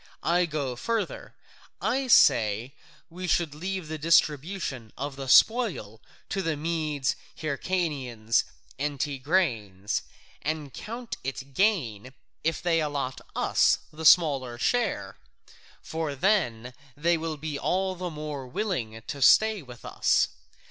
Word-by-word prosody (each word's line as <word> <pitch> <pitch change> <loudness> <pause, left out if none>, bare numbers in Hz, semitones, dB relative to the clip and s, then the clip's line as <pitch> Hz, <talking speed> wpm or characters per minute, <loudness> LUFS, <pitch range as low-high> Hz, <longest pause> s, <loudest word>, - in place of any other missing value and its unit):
I 175 +2 +2
go 145 -5 -3
further: 230 - -3 0.4
I 265 0 0
say 115 - +4
that - - -26
we 180 +1 -5
should 165 -3 +1
leave 185 +2 -4
the 155 0 -5
distribution 150 - +1
of 140 0 -4
the 135 -1 -6
spoil 205 - +4 0.3
to 195 - -1
the 165 -4 -1
Medes, 155 -3 -1 0.2
the - - -14
Hyrcanians, 135 -9 0 0.4
and 145 -1 -2
Tigranes, 130 - 0 0.4
and 150 -2 -3
count 235 +2 -6
it 135 +1 -5
gain 130 - 0 0.3
if 160 0 -1
they 165 -2 +2
allot 145 -4 -3
us - - +3 0.2
the 160 +1 -8
smaller 140 -8 +5
share, 185 - 0 0.7
for 160 -3 -3
then 130 - +1 0.2
they 170 +3 +2
will 160 -1 -3
be 145 -1 -4
all 190 +1 0
the 180 0 -4
more 150 -4 -6
willing 125 - -3
to 140 - -6
stay 215 +8 +5
with 125 -3 -13
us. - - +2
150 Hz, 130 wpm, -27 LUFS, 130-180 Hz, 0.7 s, smaller